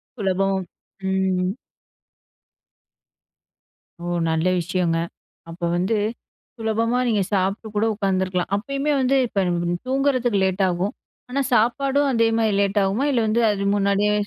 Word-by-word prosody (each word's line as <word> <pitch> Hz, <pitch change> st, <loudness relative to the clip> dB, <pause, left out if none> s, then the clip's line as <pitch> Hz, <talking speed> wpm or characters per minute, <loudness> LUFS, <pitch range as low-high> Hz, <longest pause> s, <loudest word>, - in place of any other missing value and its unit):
சுலபம் 195 Hz, -2 st, 0 dB, 0.5 s
ம். 190 Hz, -1 st, +1 dB, 2.5 s
ஓ! -, -, -4 dB, 0.2 s
நல்ல 160 Hz, +2 st, +1 dB
விஷயங்க. 175 Hz, -1 st, 0 dB, 0.5 s
அப்போ 170 Hz, +1 st, -5 dB
வந்து, 185 Hz, +6 st, +1 dB, 0.6 s
சுலபமா 225 Hz, +2 st, 0 dB
நீங்க 215 Hz, -4 st, +2 dB
சாப்ட்டு 195 Hz, +3 st, 0 dB
கூட 210 Hz, +2 st, +2 dB
உட்காந்துருக்கலாம். 190 Hz, -3 st, -1 dB
அப்பயுமே 275 Hz, +7 st, -1 dB
வந்து 260 Hz, +1 st, +2 dB
இப்ப 195 Hz, -4 st, 0 dB, 0.4 s
தூங்குறதுக்கு 255 Hz, -6 st, +1 dB
லேட்டாகும். 190 Hz, 0 st, 0 dB, 0.4 s
ஆனா, 275 Hz, +3 st, 0 dB
சாப்பாடும் 275 Hz, +5 st, +2 dB
அதே 230 Hz, -1 st, +3 dB
மாரி 220 Hz, -2 st, +2 dB
லேட் 200 Hz, +1 st, +1 dB
ஆகுமா 200 Hz, +8 st, 0 dB
இல்ல 245 Hz, -4 st, +2 dB
வந்து 220 Hz, +2 st, +2 dB
அது 200 Hz, -1 st, -2 dB
முன்னாடியே 200 Hz, +1 st, +2 dB
205 Hz, 115 wpm, -22 LUFS, 190-235 Hz, 2.5 s, அதே